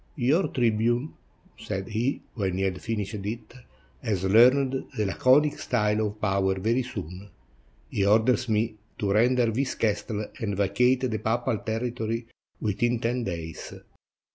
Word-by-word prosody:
"Your 150 +7 +2
tribune," 120 +3 +1 0.5
said 95 +3 -4
he, 115 +5 -1
when 95 -5 -2
he 95 - 0
had 90 -1 -1
finished 110 -2 -3
it, 115 +4 -6 0.5
"has 100 -4 -1
learned 130 +6 +4
the 105 - +1
laconic 130 - +3
style 105 -2 +1
of 105 +1 -8
power 95 -2 +1
very 115 +6 +1
soon. 100 -5 -7 0.6
He 100 - -1
orders 115 +5 +3
me 110 +1 +1 0.2
to 100 -2 -1
render 120 +4 +4
this 130 +4 -1
castle 105 0 -1
and 100 -4 -2
vacate 125 +6 +2
the 120 -4 -1
papal 115 0 0
territory 115 0 -3 0.3
within 115 +3 0
ten 120 +1 -1
days. 85 -3 -6
110 Hz, 140 wpm, -26 LUFS, 100-125 Hz, 0.6 s, learned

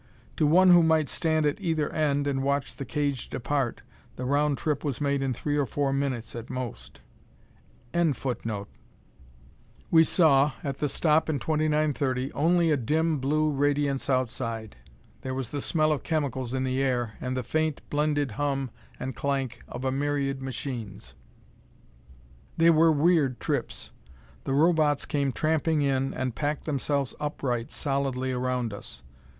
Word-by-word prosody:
To 155 - +3
one 180 +4 +6
who 175 -1 +8
might 160 -3 +3
stand 160 -2 +1
at 145 +6 0
either 160 -5 0
end 145 -2 +1
and 135 -1 0
watch 140 +1 -1
the 140 - -6
cage 140 -3 -2
depart, 130 -1 -2 0.3
the 125 - -5
round 145 +1 +2
trip 150 -3 -1
was 140 -6 -2
made 140 -1 0
in 135 -1 0
three 145 +4 -2
or 145 -2 +1
four 140 +2 0
minutes 130 -5 -2
at 115 +1 -7
most.] 125 -2 -6 0.9
We 170 -2 +3 1.9
saw, 150 -4 +4
at 140 -1 -4
the 150 - 0
stop 155 +3 +2
in 155 - +1
2930, 150 -3 0
only 165 +2 +3
a 150 - +3
dim 155 +5 +1
blue 155 +3 +1
radiance 145 -1 0
outside. 115 -4 -2 0.5
There 130 0 -4
was 130 -3 -4
the 145 - -3
smell 155 +1 +2
of 150 - 0
chemicals 130 -6 -2
in 130 - 0
the 130 +1 0
air, 120 -4 0
and 130 0 -2
the 130 - -2
faint, 155 +3 -1
blended 145 -2 +1
hum 135 +1 -2 0.3
and 130 0 -4
clank 135 -3 -2
of 125 +2 -6
a 130 - +1
myriad 140 -1 -1
machines. 125 -6 -6 1.4
They 165 +1 +6
were 165 0 +5
weird 150 -4 +2
trips. - - -3 0.5
The 135 - -1
Robots 155 -2 +3
came 140 -2 0
tramping 155 +2 +1
in, 135 -1 +1
and 130 -2 -3
packed 145 +3 -2
themselves 140 -2 -1
upright, 130 -4 -2
solidly, 135 -3 -1
around 125 -3 -1
us. 65 -10 -9
140 Hz, 150 wpm, -27 LUFS, 130-155 Hz, 1.9 s, who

